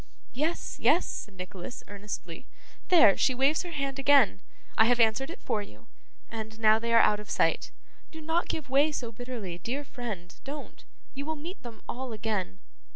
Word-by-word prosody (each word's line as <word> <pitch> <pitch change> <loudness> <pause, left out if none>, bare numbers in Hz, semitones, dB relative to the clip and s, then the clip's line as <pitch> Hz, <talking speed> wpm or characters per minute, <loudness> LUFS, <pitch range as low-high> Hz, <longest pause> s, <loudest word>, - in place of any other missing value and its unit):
'Yes, 310 +6 -2
yes!' 350 - +4
said 205 -3 -6
Nicholas 185 +3 -7
earnestly. 205 -1 -7 0.4
'There! 270 - +7
She 260 - +3
waves 275 +4 +3
her 355 - -6
hand 275 -4 -3
again! 270 -8 +5 0.3
I 220 - +6
have 245 +1 +3
answered 230 +5 +3
it 335 - -8
for 210 - -1
you 110 - -13 0.4
and 220 -1 -7
now 220 0 +5
they 230 +1 -2
are 230 - +7
out 210 -2 +4
of 210 - -10
sight. - - +1 0.4
Do 320 - -10
not 325 +2 0
give 310 -4 -3
way 280 +4 +4
so 240 -6 -4
bitterly, 225 -7 -6
dear 260 - -3
friend, 215 -10 -6
don't. 285 +1 -8 0.3
You 280 +2 -5
will 315 - -1
meet 330 +6 -8
them 230 -3 -10
all 255 -1 -4
again. 210 - -2
240 Hz, 180 wpm, -29 LUFS, 210-280 Hz, 0.4 s, There